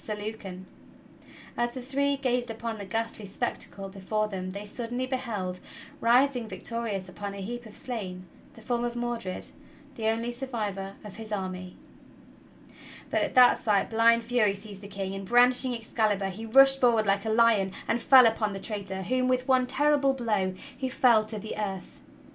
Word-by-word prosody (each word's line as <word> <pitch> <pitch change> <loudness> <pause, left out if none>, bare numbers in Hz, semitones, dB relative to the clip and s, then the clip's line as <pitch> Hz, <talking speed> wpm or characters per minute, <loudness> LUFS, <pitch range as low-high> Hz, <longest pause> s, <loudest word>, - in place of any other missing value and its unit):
Sir 215 - -3
Lucan. 205 -3 -7 0.9
As 240 0 -1
the - - -4
three 280 +2 0
gazed 250 -2 0
upon 225 0 -5
the 200 - -6
ghastly 225 +1 -3
spectacle 195 0 -4
before 200 +2 -2
them 185 -3 -5
they 200 +2 -6
suddenly 240 +4 -4
beheld, 220 -9 -3 0.4
rising 245 0 +3
victorious 225 -5 -4
upon 200 +2 -6
a 200 - -6
heap 240 +4 -6
of 215 - -11
slain, 205 -9 -5 0.3
the 225 - -14
form 240 +1 -1
of 240 0 -2
Mordred, 240 -5 -4 0.4
the 225 -4 -3
only 230 +2 0
sur 255 +3 -6
vivor 200 -5 -4
of 210 -1 -10
his 220 -1 -8
army. 185 -2 -4 1.4
But - - +2
at - - -2
that 250 -1 +7
sight 205 -1 +1
blind 230 +1 +4
fury 230 -4 +2
seized 200 -1 -8
the 200 - -9
King, 195 -1 -4
and, 195 0 -5
brandishing 245 +3 +4
Excalibur, 215 -4 0
he 220 +4 -7
rushed 270 +3 +6
forward 230 -3 +4
like 200 0 +1
a - - -1
lion 220 -4 +4 0.2
and 235 - 0
fell 260 -1 +8
upon 220 -2 +1
the 195 - -5
traitor 195 -3 -4
whom, 255 +6 0
with 255 0 +1
one 255 -1 +3
terrible 285 -1 +2
blow, 210 -7 -1 0.2
he 260 0 -3
felled 240 -5 +4
to 215 0 -6
the 215 +1 -6
earth. 195 -3 -5
225 Hz, 175 wpm, -28 LUFS, 200-245 Hz, 1.4 s, fell